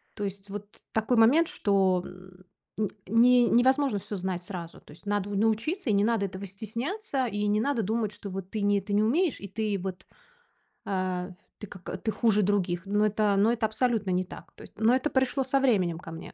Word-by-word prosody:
То 205 Hz, -, -5 dB
есть 195 Hz, 0 st, -6 dB
вот 205 Hz, +1 st, -6 dB, 0.3 s
такой 225 Hz, +2 st, +1 dB
момент, 285 Hz, +9 st, +5 dB
что 190 Hz, -3 st, +2 dB, 0.8 s
м 210 Hz, -, +1 dB, 0.2 s
не 240 Hz, +3 st, +5 dB
невозможно 260 Hz, -1 st, +3 dB
всё 205 Hz, -, -6 dB
знать 180 Hz, -1 st, -3 dB
сразу. 175 Hz, -3 st, -8 dB
То -, -, -17 dB
есть 180 Hz, -, -18 dB
надо 205 Hz, -1 st, -1 dB
научиться, 225 Hz, -, 0 dB
и -, -, +3 dB
не 200 Hz, +1 st, +3 dB
надо 225 Hz, -3 st, +1 dB
этого 190 Hz, +1 st, -7 dB
стесняться, 250 Hz, -, -3 dB
и 205 Hz, -1 st, -2 dB
не 210 Hz, +1 st, +2 dB
надо 280 Hz, -3 st, 0 dB
думать, 220 Hz, +1 st, -1 dB
что 205 Hz, -1 st, -8 dB
вот 190 Hz, 0 st, -6 dB
ты 215 Hz, -2 st, -3 dB
не 200 Hz, -1 st, +2 dB
ты 205 Hz, +1 st, -5 dB
не 210 Hz, +1 st, +3 dB
умеешь, 315 Hz, +8 st, +1 dB
и 200 Hz, -, -6 dB
ты 210 Hz, +1 st, -2 dB
вот, 185 Hz, -1 st, -6 dB, 0.8 s
а 185 Hz, -1 st, -2 dB, 0.3 s
ты 210 Hz, -, -7 dB
как, 185 Hz, 0 st, -8 dB
ты 220 Hz, -, 0 dB
хуже 210 Hz, 0 st, +2 dB
других. 185 Hz, -3 st, 0 dB
Ну, 205 Hz, +2 st, +2 dB
это, 210 Hz, -1 st, +2 dB
ну, 215 Hz, +4 st, +4 dB
это 225 Hz, -2 st, 0 dB
абсолютно 220 Hz, -3 st, 0 dB
не 180 Hz, +1 st, +1 dB
так, -, -, -12 dB
то -, -, -13 dB
есть. -, -, -15 dB
Но 225 Hz, +3 st, +4 dB
это 265 Hz, +4 st, 0 dB
пришло 265 Hz, +1 st, +1 dB
со 270 Hz, +1 st, +1 dB
временем 185 Hz, -11 st, +2 dB
ко 165 Hz, -, -10 dB
мне, 165 Hz, -, -9 dB
210 Hz, 210 wpm, -28 LUFS, 195-235 Hz, 0.8 s, момент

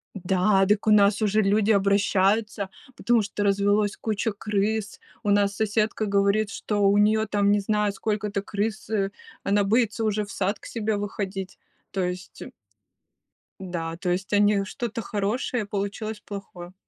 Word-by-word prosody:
М, 200 Hz, -, -7 dB
да, 190 Hz, +1 st, +3 dB
так 210 Hz, +2 st, +1 dB
у -, -, +5 dB
нас 205 Hz, 0 st, +5 dB
уже 215 Hz, 0 st, +3 dB
люди 210 Hz, +2 st, +2 dB
обращаются, 200 Hz, +1 st, +2 dB, 0.3 s
потому 235 Hz, -2 st, +2 dB
что 205 Hz, 0 st, -3 dB
развелось 205 Hz, +1 st, +2 dB
куча 220 Hz, 0 st, -1 dB
крыс, 210 Hz, +1 st, -2 dB, 0.2 s
у 210 Hz, -, -1 dB
нас 200 Hz, -1 st, +2 dB
соседка 215 Hz, +1 st, 0 dB
говорит, 200 Hz, +1 st, +2 dB
что 210 Hz, -, -3 dB
у 200 Hz, +1 st, +4 dB
неё 215 Hz, +1 st, +3 dB
там, 205 Hz, -1 st, +2 dB
не 205 Hz, -, +3 dB
знаю, 210 Hz, 0 st, 0 dB
сколько-то 210 Hz, -1 st, -2 dB
крыс, 205 Hz, +1 st, -3 dB
э, 200 Hz, -3 st, 0 dB, 0.3 s
она 205 Hz, +1 st, +2 dB
боится 225 Hz, +2 st, +1 dB
уже 215 Hz, -1 st, 0 dB
в 200 Hz, -, -9 dB
сад 200 Hz, +2 st, -1 dB
к -, -, -15 dB
себе 220 Hz, -2 st, -2 dB
выходить, 195 Hz, -2 st, -5 dB, 0.3 s
то 195 Hz, -, -2 dB
есть. 180 Hz, +1 st, -5 dB, 1.2 s
Да, 165 Hz, -3 st, -4 dB
то 180 Hz, 0 st, -3 dB
есть 185 Hz, +3 st, -2 dB
они 205 Hz, -1 st, +4 dB
что-то 230 Hz, +2 st, -4 dB
хорошее, 215 Hz, +3 st, -2 dB
получилось 205 Hz, +2 st, -4 dB
плохое. 185 Hz, -3 st, -9 dB
205 Hz, 155 wpm, -25 LUFS, 195-215 Hz, 1.2 s, у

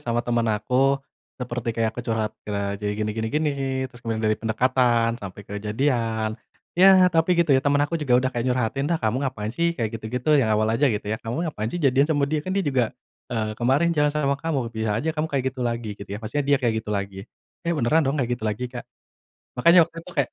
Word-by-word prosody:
sama 120 Hz, 0 st, -1 dB
temen 120 Hz, -1 st, +1 dB
aku, 125 Hz, +6 st, +2 dB, 0.4 s
seperti 120 Hz, -2 st, -4 dB
kayak 115 Hz, -1 st, +1 dB
aku 120 Hz, -, -5 dB
curhat 110 Hz, -2 st, 0 dB
kere 100 Hz, -1 st, -3 dB
jadi, 105 Hz, 0 st, -1 dB
gini 105 Hz, 0 st, -1 dB
gini 110 Hz, 0 st, -2 dB
gini, 150 Hz, +4 st, 0 dB, 0.4 s
terus 130 Hz, -2 st, -10 dB
kemudian 115 Hz, -1 st, -3 dB
dari 110 Hz, -, +3 dB
pendekatan 120 Hz, 0 st, +2 dB
sampai 100 Hz, 0 st, -8 dB
ke 100 Hz, -, -11 dB
jadian, 110 Hz, -1 st, 0 dB, 0.4 s
ya 185 Hz, +1 st, +7 dB
tapi 165 Hz, +2 st, +3 dB
gitu 170 Hz, -4 st, +3 dB
ya, 130 Hz, -, +5 dB
temen 145 Hz, +1 st, +2 dB
aku 165 Hz, +2 st, -3 dB
juga 130 Hz, -5 st, +3 dB
udah 130 Hz, +1 st, +1 dB
kayak 120 Hz, -1 st, -2 dB
nyurhatin, 125 Hz, +3 st, 0 dB
"Dah, 170 Hz, -, +2 dB
kamu 115 Hz, -2 st, -1 dB
ngapain 110 Hz, -4 st, -5 dB
sih, 170 Hz, +4 st, 0 dB
kayak 115 Hz, -2 st, -3 dB
gitu -, -, -17 dB
gitu," 125 Hz, +5 st, -1 dB
yang 115 Hz, -, +1 dB
awal 110 Hz, -, +2 dB
aja 140 Hz, +5 st, +3 dB
gitu 105 Hz, -4 st, -2 dB
ya, 110 Hz, +2 st, -3 dB
"kamu 125 Hz, +8 st, -3 dB
ngapain 110 Hz, -3 st, -3 dB
sih, 175 Hz, -, -4 dB
jadian 140 Hz, -1 st, +3 dB
sama 145 Hz, -3 st, +2 dB
dia, 150 Hz, +2 st, -1 dB
kan 155 Hz, -, -9 dB
dia 195 Hz, -, +1 dB
juga, 125 Hz, -4 st, 0 dB, 0.3 s
eee, 110 Hz, -2 st, -2 dB
kemarin 140 Hz, +8 st, +3 dB
jalan 150 Hz, -2 st, +2 dB
sama 140 Hz, -2 st, 0 dB
kamu, 140 Hz, -8 st, -2 dB
bisa 110 Hz, -2 st, -1 dB
aja 160 Hz, +8 st, -1 dB
kamu 155 Hz, 0 st, -2 dB
kayak 135 Hz, -3 st, -1 dB
gitu 130 Hz, -, -9 dB
lagi," 115 Hz, -2 st, -2 dB
gitu 100 Hz, -1 st, -11 dB
ya. 100 Hz, -, -4 dB
Maksudnya 115 Hz, +7 st, -3 dB
dia 145 Hz, -, +5 dB
kayak 120 Hz, -4 st, 0 dB
gitu 110 Hz, -, -14 dB
lagi, 100 Hz, -2 st, -3 dB, 0.4 s
eh 170 Hz, -, -1 dB
beneran 150 Hz, +3 st, +2 dB
dong 140 Hz, -, 0 dB
kayak 125 Hz, -4 st, -1 dB
gitu -, -, -5 dB
lagi, 120 Hz, +4 st, -4 dB
Kak. 120 Hz, -, -8 dB, 0.7 s
Makanya 170 Hz, +5 st, +7 dB
waktu 165 Hz, 0 st, -19 dB
itu 175 Hz, +2 st, -12 dB
kayak 140 Hz, -4 st, +1 dB
125 Hz, 235 wpm, -24 LUFS, 110-145 Hz, 0.7 s, ya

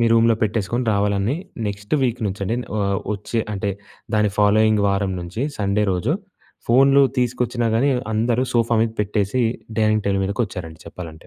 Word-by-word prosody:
మీ 115 Hz, -, +4 dB
రూమ్‍లో 115 Hz, 0 st, +5 dB
పెట్టేసుకొని 110 Hz, +3 st, 0 dB
రావాలని 100 Hz, +5 st, +1 dB, 0.3 s
నెక్స్ట్ 105 Hz, +4 st, -3 dB
వీక్ 125 Hz, -2 st, 0 dB
నుంచి 100 Hz, 0 st, -4 dB
అని, 115 Hz, +5 st, -1 dB, 0.2 s
ఆహ్, 100 Hz, -1 st, 0 dB, 0.2 s
వచ్చే 105 Hz, +3 st, -2 dB
అంటే 100 Hz, 0 st, -2 dB, 0.4 s
దాని 105 Hz, -1 st, +2 dB
ఫాలోయింగ్ 105 Hz, 0 st, +4 dB
వారం 100 Hz, -1 st, 0 dB
నుంచి 90 Hz, +8 st, -5 dB, 0.2 s
సండే 105 Hz, +1 st, +1 dB
రోజు 105 Hz, -, 0 dB, 0.6 s
ఫోన్లు 135 Hz, +3 st, +5 dB, 0.2 s
తీసుకొచ్చినా 120 Hz, -1 st, 0 dB
కాని 130 Hz, +5 st, +3 dB, 0.2 s
అందరూ 115 Hz, +3 st, +1 dB
సోఫా 115 Hz, 0 st, +2 dB
మీద 115 Hz, -1 st, -1 dB
పెట్టేసి 105 Hz, +3 st, 0 dB, 0.4 s
డైనింగ్ 110 Hz, -1 st, +2 dB
టేబుల్ 100 Hz, -1 st, +1 dB
మీదకొచ్చారండి 90 Hz, -6 st, -4 dB
చెప్పాలంటే. 80 Hz, -3 st, -9 dB
105 Hz, 150 wpm, -21 LUFS, 100-115 Hz, 0.6 s, రూమ్‍లో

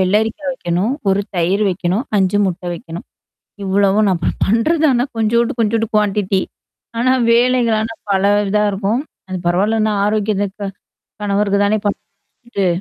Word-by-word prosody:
வெள்ளரிக்கா 215 Hz, +9 st, +1 dB
வைக்கணும். 185 Hz, -1 st, -1 dB, 0.2 s
ஒரு 195 Hz, +1 st, +3 dB, 0.2 s
தயிர் 180 Hz, +4 st, +1 dB
வைக்கணும். 185 Hz, +5 st, -1 dB
5 190 Hz, +1 st, +2 dB
முட்டை 180 Hz, -1 st, -4 dB
வைக்கணும். 165 Hz, 0 st, -9 dB, 0.6 s
இவ்வளவும் 200 Hz, +2 st, +2 dB
நான் 175 Hz, -3 st, 0 dB, 0.2 s
பண்றது 230 Hz, +11 st, +2 dB
தானா 250 Hz, -3 st, +3 dB
கொஞ்சோண்ட்டு, 230 Hz, +2 st, +1 dB
கொஞ்சோண்ட்டு 225 Hz, +1 st, 0 dB
குவான்ட்டி 200 Hz, -2 st, +1 dB, 0.6 s
ஆனா 255 Hz, +2 st, +3 dB, 0.2 s
வேலைகள் 240 Hz, -1 st, +3 dB
ஆனா 225 Hz, +1 st, -3 dB, 0.2 s
பல 195 Hz, -1 st, +2 dB, 0.3 s
இதா 210 Hz, +1 st, +2 dB
இருக்கும். 200 Hz, +4 st, -1 dB, 0.3 s
அது 185 Hz, -, -3 dB
பரவால்லன்னா 215 Hz, +5 st, +1 dB
ஆரோக்கியத்துக்கு 205 Hz, -1 st, -1 dB, 0.6 s
கணவருக்கு 200 Hz, 0 st, +1 dB
தானே 205 Hz, +2 st, +2 dB, 0.5 s
பண்றது. 200 Hz, -6 st, -4 dB
205 Hz, 125 wpm, -17 LUFS, 190-225 Hz, 0.6 s, ஒரு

